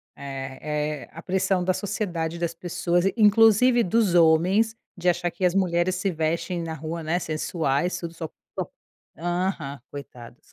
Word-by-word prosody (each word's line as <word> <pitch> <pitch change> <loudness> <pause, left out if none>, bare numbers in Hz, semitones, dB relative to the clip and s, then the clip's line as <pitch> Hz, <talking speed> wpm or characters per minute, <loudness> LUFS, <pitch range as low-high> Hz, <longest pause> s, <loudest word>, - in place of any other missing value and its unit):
É 140 +2 -4
é, - - -14
a 165 - -9
pressão 190 0 +1
da 185 +1 +2
sociedade 180 -5 -2
e - - -7
das 170 -1 -1
pessoas 175 +1 0
in 195 - +2
inclusive 225 +3 +6
dos 210 -1 +2
homens 180 +7 +4 0.2
de 180 0 -3
achar 175 0 0
que 180 +2 -2
as 180 0 +2
mulheres 180 -1 +2
se 185 +2 -1
vestem 165 +2 -1
na 165 -1 -4
rua, 160 +2 -5
né, 160 +2 0
sensuais 155 0 -1
tudo 170 -1 -6
só 165 -1 -5
po - - -31 0.2
po - - -4 0.5
aham, 175 -4 -2
coitados. 125 -1 -11
170 Hz, 170 wpm, -25 LUFS, 160-185 Hz, 0.5 s, inclusive